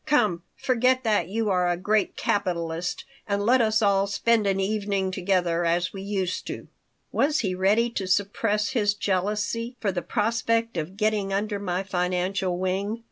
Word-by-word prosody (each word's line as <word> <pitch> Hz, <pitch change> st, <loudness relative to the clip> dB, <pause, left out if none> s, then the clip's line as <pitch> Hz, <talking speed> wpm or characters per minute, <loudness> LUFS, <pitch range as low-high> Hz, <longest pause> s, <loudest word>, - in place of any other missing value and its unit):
Come, 210 Hz, -, +2 dB
forget 255 Hz, 0 st, +2 dB
that 215 Hz, -3 st, +1 dB
you 215 Hz, +2 st, -1 dB
are 180 Hz, -1 st, +2 dB
a 175 Hz, -, 0 dB
great 210 Hz, +3 st, +1 dB
capitalist 175 Hz, -3 st, -1 dB, 0.2 s
and 200 Hz, 0 st, 0 dB
let 250 Hz, +2 st, +5 dB
us 220 Hz, 0 st, +2 dB
all 200 Hz, -1 st, +3 dB
spend 215 Hz, +1 st, +2 dB
an 195 Hz, 0 st, +1 dB
evening 200 Hz, -1 st, -1 dB
together 180 Hz, -2 st, 0 dB
as 175 Hz, +2 st, +1 dB
we 195 Hz, -, -6 dB
used 195 Hz, -2 st, -2 dB
to." -, -, -6 dB, 0.4 s
Was 295 Hz, +2 st, +2 dB
he 195 Hz, -5 st, -1 dB
ready 200 Hz, +6 st, +3 dB
to 195 Hz, -5 st, -3 dB
suppress 205 Hz, +2 st, +1 dB
his 210 Hz, -6 st, +1 dB
jealousy 210 Hz, +5 st, -1 dB
for 200 Hz, -, 0 dB
the 180 Hz, -1 st, -2 dB
prospect 230 Hz, +1 st, 0 dB
of 170 Hz, +4 st, -4 dB
getting 210 Hz, -2 st, 0 dB
under 205 Hz, +1 st, -1 dB
my 185 Hz, -1 st, -2 dB
financial 180 Hz, 0 st, -1 dB
wing? 195 Hz, +4 st, -1 dB
200 Hz, 165 wpm, -25 LUFS, 185-215 Hz, 0.4 s, let